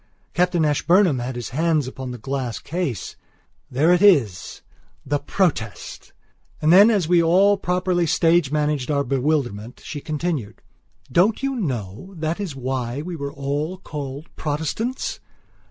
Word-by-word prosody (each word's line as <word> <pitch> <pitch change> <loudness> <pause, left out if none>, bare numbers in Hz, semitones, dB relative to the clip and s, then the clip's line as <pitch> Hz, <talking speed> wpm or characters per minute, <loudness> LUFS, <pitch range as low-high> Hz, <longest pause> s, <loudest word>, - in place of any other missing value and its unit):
Captain 175 -2 +2
Ashburnham 165 +1 +3
had 125 +1 -4
his 120 -4 -5
hands 155 0 +1
upon 130 0 -6
the 125 - -6
glass 130 -1 -3
case. 160 - -4 0.5
"There 150 +7 +3
it 180 - +2
isthe 140 - +3 0.7
Protest." 135 - -2 0.5
And 155 +2 +4
then, 200 +4 +8
as 200 -8 +1
we 175 0 +4
all 190 +5 +4
properly 180 -2 0
stage 165 -2 +3
managed 150 -3 0
our 140 -1 +1
bewilderment, 125 -5 -1
she 145 - -6
continued: 155 -7 -3 0.5
"Don't 200 - +3
you 275 0 0
know 130 - -4
that 160 +3 -2
is 185 -9 -4
why 130 0 -3
we 175 +1 -5
were 140 -2 -5
all 145 +5 -3
called 145 -3 -7
Protestants? 160 - -3
150 Hz, 140 wpm, -22 LUFS, 130-180 Hz, 0.7 s, then